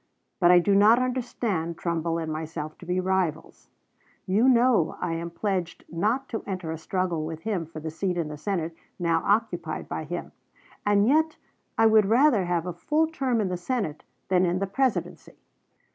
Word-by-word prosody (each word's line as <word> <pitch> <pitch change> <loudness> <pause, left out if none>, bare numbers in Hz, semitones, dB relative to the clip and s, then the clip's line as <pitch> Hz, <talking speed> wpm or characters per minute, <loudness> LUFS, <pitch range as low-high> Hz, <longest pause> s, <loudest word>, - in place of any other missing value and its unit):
But 175 -2 +5
I 180 - +8
do 185 +3 +3
not 210 +4 +6
understand 235 -9 -2
Trumbull 165 -1 -1
and 160 -2 -3
myself 155 -1 -5
to 175 - -12
be 180 +1 0
rivals. 185 -4 -2 0.6
You 210 +7 +3
know 240 -8 +3
I 175 -2 -2
am 170 +1 -4
pledged 180 0 -3
not 215 +11 0
to 225 - -3
enter 185 -5 -4
a 160 - -4
struggle 180 -2 -1
with 160 0 -6
him 195 -6 -2
for 155 -1 -8
the 160 +1 -5
seat 180 +2 -2
in 165 -3 -1
the 150 - -6
Senate 165 0 -3 0.2
now 165 -2 +1
occupied 225 +3 0
by - - -4
him; - - -5 0.6
and 205 0 +4
yet 315 +3 +2 0.4
I 225 - +5
would 220 -2 +5
rather 230 -3 +4
have 175 -1 -1
a 180 - -3
full 300 - +1
term 265 -7 0
in 200 -3 0
the 180 - -2
Senate 175 - -3 0.2
than 185 -1 +3
in 180 0 +1
the 195 - 0
Presidency." 255 +6 -2
185 Hz, 185 wpm, -26 LUFS, 165-220 Hz, 0.6 s, I